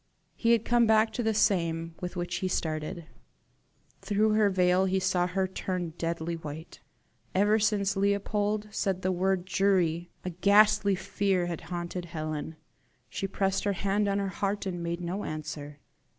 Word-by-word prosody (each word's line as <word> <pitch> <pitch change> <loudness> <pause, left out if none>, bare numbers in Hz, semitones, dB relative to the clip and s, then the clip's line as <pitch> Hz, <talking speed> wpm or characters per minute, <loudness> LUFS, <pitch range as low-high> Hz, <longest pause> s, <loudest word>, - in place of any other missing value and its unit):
He 235 0 +3
had 230 -1 +1
come 240 -1 +4
back 220 0 +4
to 240 - -2
the 220 -2 0
same 165 -6 +1
with 180 0 -5
which 175 0 -2
he 185 - -1
started. 160 0 -3 1.0
Through 210 +2 +2
her 215 -1 +4
veil 185 0 +3
he 190 0 +1
saw 185 -1 +1
her 190 +1 0
turn 185 -3 -4
deadly 170 0 -2
white. 160 0 -8 0.6
Ever 205 +3 +4
since 205 -2 +1
Leopold 205 +1 0
said 190 -2 -1
the 185 - +1
word 185 0 0
JURY, 180 -3 +1 0.2
a 180 - -2
ghastly 200 +2 +4
fear 190 -1 0
had 170 -2 -4
haunted 175 0 -4
Helen. 155 -1 -5 0.5
She 195 - -3
pressed 195 0 0
her 205 - +1
hand 200 +2 0
on 200 0 +1
her 200 -1 -1
heart 200 +3 -2
and 175 -2 -3
made 170 +1 -3
no 180 +4 -3
answer. 150 -1 -6
190 Hz, 165 wpm, -28 LUFS, 170-200 Hz, 1.0 s, come